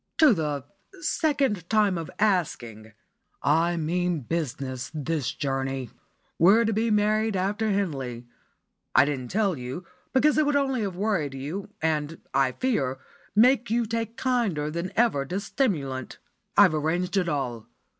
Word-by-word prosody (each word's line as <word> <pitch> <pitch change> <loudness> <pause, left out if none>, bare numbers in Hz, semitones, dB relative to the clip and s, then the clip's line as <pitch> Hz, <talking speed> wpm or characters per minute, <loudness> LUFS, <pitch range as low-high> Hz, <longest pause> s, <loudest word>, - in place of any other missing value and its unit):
"To 310 -6 +7
the 150 -6 -2 0.4
'second 275 - 0
time 210 -3 +3
of 165 -2 -4
asking.' 120 - -1 0.5
I 165 +4 +2
mean 170 0 0
business 135 -3 -3
this 150 -3 -1
journey. 135 -2 -3 0.5
We're 205 +7 +6
to 225 - +1
be 225 +2 +1
married 215 0 +2
after 205 +4 0
Henley. 135 - -2 0.7
I - - +7
didn't 135 -4 -3
tell 200 -3 +1
you, 130 +8 -6 0.3
because 300 +4 +3
it 305 - +4
would 290 - +2
only 270 -4 +1
have 195 -4 -3
worried 185 -9 -1
you, 160 +10 -5
and, 155 0 -1
I 135 -1 +2
fear, 140 - 0 0.4
make 245 +2 +4
you 235 +1 +1
take 230 +1 -3
kinder 220 - 0
than 170 +3 -3
ever 225 -12 +3
to 185 +5 -2
stimulant. 145 - -2 0.4
I've - - +7
arranged 165 +5 -1
it 180 -3 +1
all. 125 -7 -3
175 Hz, 145 wpm, -26 LUFS, 140-220 Hz, 0.7 s, To